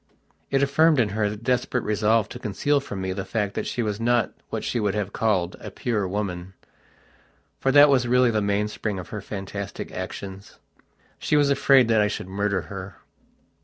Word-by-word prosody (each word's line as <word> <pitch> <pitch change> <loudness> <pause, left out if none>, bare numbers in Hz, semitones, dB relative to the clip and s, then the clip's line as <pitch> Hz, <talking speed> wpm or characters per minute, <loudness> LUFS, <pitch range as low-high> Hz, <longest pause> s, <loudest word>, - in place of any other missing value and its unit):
It 135 0 +2
affirmed 150 +2 +4
in 110 -4 +2
her 105 +1 0
the 105 - -5
desperate 125 +1 0
resolve 105 +1 +2
to - - -8
conceal 140 +8 0
from 100 -8 -6
me 95 0 -2
the 95 0 -4
fact 100 0 -2
that - - -3
she 120 - -2
was 105 -1 -2
not 120 -1 +1 0.2
what - - -4
she 120 - -1
would 105 -2 0
have 100 -2 -3
called 95 -6 0
"a - - -7
pure 110 -7 -2
woman". 95 -2 -4 1.0
For 135 - +1
that 145 +1 +8
was 130 -4 +3
really 125 0 +4
the 110 -1 +1
mainspring 105 0 -1
of 90 - -7
her 105 - -5
fantastic 100 0 -6
actions. 95 +1 -7 0.6
She 150 - +1
was 145 -1 +3
afraid 135 -3 +5
that 110 -2 +4
I 105 - +3
should 105 - -4
murder 100 0 -1
her.... 95 0 -8
105 Hz, 190 wpm, -24 LUFS, 100-125 Hz, 1.0 s, that